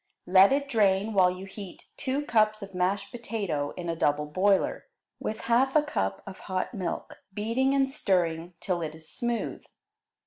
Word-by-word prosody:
Let 190 +4 +7
it 280 +1 +1
drain 210 -3 +2
while 185 -2 +5
you 185 +1 -6
heat 195 -1 -10
two 280 +2 -2
cups 215 -4 +2
of 195 -1 -9
mashed 195 +2 0
potato 200 -12 -3
in 175 -1 -5
a 165 - -1
double 150 -1 +1
boiler, 190 +6 +1 0.3
with 215 - -4
half 260 +4 +2
a 305 - +6
cup 95 - -2
of 195 -1 -9
hot 185 +6 -1
milk, 185 -6 -5
beating 230 +7 +1
and 270 -1 +3
stirring 175 - 0
till 180 -3 -1
it 155 -1 -4
is 160 0 -13
smooth. 240 +4 -3
195 Hz, 170 wpm, -28 LUFS, 180-230 Hz, 0.3 s, Let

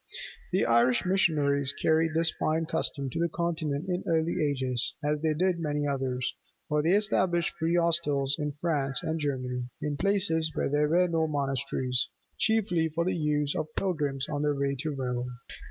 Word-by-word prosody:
The - - +2
Irish 120 +4 +3
missionaries 145 -7 +2
carried 160 +2 +1
this 165 0 +3
fine 160 +1 +1
custom 140 -3 -2
to - - -3
the 170 0 +1
Continent 160 -3 -2
in 180 0 -1
early 165 0 +1
ages, 130 -4 0
as 150 0 0
they 160 -1 +1
did 180 +1 +1
many 150 -2 -1
others: 130 -3 -1 0.3
for 150 0 +1
they 165 +4 +2
established 185 -4 +2
free 165 +1 +1
hostels 155 -5 +1
in 150 -1 -2
France 140 -4 -1
and 160 0 -1
Germany, 125 -4 -2
in 150 -1 -2
places 180 -4 +2
where - - 0
there 150 +1 +2
were 180 +3 +4
no 165 -2 +1
monasteries, 135 -3 -1 0.3
chiefly 190 -7 +2
for 165 +2 -1
the 185 - 0
use 150 -3 0
of 155 -3 -2
pilgrims 145 -8 -1
on 145 -1 -2
their 150 -1 +1
way 140 0 0
to 155 - -2
Rome. 125 -3 -3
150 Hz, 170 wpm, -28 LUFS, 140-170 Hz, 0.3 s, were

